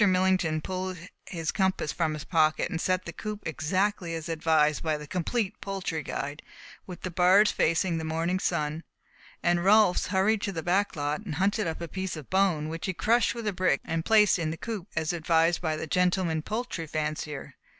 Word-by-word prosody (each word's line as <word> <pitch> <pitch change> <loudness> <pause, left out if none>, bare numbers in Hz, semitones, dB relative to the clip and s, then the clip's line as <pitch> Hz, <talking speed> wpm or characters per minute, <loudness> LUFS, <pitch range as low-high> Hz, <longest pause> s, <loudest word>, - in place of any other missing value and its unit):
Millington 185 -5 +3
pulled 185 +1 -4 0.3
his 165 -4 -3
compass 190 -5 0
from 160 -3 0
his 150 - -6
pocket 155 -2 +2
and 165 - -2
set 185 0 0
the 170 - -6
coop 210 +2 -6
exactly 170 +3 -1
as 165 +1 -6
advised 155 -2 +2
by 155 -2 0
"The 150 - -8
Complete 195 +6 -2
Poultry 190 -5 -3
Guide," 145 +1 -5 0.5
with 180 -2 -8
the 185 - -4
bars 185 +4 +5
facing 165 +1 +1
the - - -4
morning 165 +3 -1
sun, 160 -3 -1 0.6
and 175 0 +2
Rolfs 205 -1 +4
hurried 200 +3 +2
into 200 - -2
the 160 -2 -4
back 195 +4 +1
lot 150 +5 -2
and 170 -9 -5
hunted 200 +3 +1
up 165 +1 -4
a 170 - -4
piece 190 +2 -4
of 155 -4 -10
bone, 185 -6 +2
which 165 +2 -4
he 190 - -1
crushed 235 +6 +2
with 230 -2 -5
a 210 - 0
brick 180 -6 +2
and 165 0 -2
placed 210 -2 +5
in 160 -2 -1
the 160 - -4
coop, 210 -2 -5
as 160 +1 0
advised 165 0 +2
by 160 -3 0
"The 155 - -4
Gentleman 180 -1 +1
Poultry 215 -4 -4
Fancier." 150 -1 -4
175 Hz, 195 wpm, -28 LUFS, 160-190 Hz, 0.6 s, bars